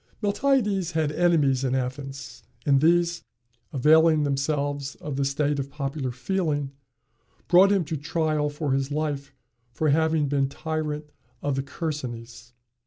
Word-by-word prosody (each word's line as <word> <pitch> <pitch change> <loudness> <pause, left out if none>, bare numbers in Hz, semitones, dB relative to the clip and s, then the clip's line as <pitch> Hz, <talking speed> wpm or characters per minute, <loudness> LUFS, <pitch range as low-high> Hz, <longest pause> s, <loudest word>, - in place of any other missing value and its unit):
Miltiades 205 - +1
had 155 -2 +1
enemies 150 -6 +2
at 130 -1 0
Athens; 130 -1 -5 0.2
and 140 -2 +4
these, 170 +1 +3 0.5
availing 155 +3 +5
themselves 145 0 -1
of 150 -3 -6
the 140 - 0
state 140 +1 0
of 140 0 -3
popular 140 -1 -3
feeling, 145 0 -1 0.8
brought 185 +3 +6
him 195 -4 +2
to 160 - -3
trial 155 0 0
for 145 -1 -3
his 135 0 0
life 145 -2 -3 0.4
for 155 +6 0
having 160 0 +2
been 135 -1 +1
tyrant 150 0 -4 0.3
of 145 -2 0
the 135 - 0
Chersonese. 125 -6 -6
145 Hz, 135 wpm, -25 LUFS, 135-160 Hz, 0.8 s, brought